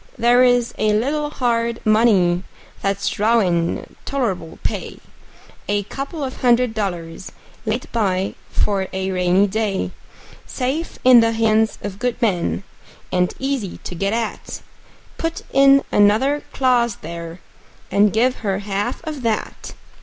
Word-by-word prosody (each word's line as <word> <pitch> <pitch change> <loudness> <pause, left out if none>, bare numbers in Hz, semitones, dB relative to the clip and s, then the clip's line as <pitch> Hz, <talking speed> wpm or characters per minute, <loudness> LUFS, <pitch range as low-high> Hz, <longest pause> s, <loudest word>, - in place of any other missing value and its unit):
There 240 +2 +5
is 245 -1 +3
a 215 -1 +2
little 290 +7 0
hard 235 -4 -1
money 210 -6 +4 0.4
that's 200 0 -1
drawin' 195 -6 +1
tol'rable 195 -12 -3
pay: - - -4 0.7
A 205 0 0
couple 275 - -6
of 260 -1 -5
hundred 245 -1 +3
dollars 180 -4 -4 0.4
laid 230 +3 -1
by 195 -4 0 0.2
for 195 -2 0
a 190 0 -2
rainy 180 +1 +3
day; 205 -1 -1 0.6
Safe 275 +6 -3
in 255 -1 +8
the 230 0 +3
hands 220 -1 +2
of 200 -1 -6
good 245 -1 -1
men, 195 -4 0 0.5
and 180 0 +1
easy 265 -8 -3
to - - -6
get 195 +3 -1
at; 225 -1 -4 0.6
Put 330 0 -3
in 275 0 +6
another 225 +8 +3
clause 245 -4 +2
there, 170 +1 -8 0.5
and 205 0 +4
give 250 +4 +2
her 195 -3 -1
half 205 +4 -3
of 305 -4 -5
that. 225 -3 -3
220 Hz, 130 wpm, -20 LUFS, 195-250 Hz, 0.7 s, in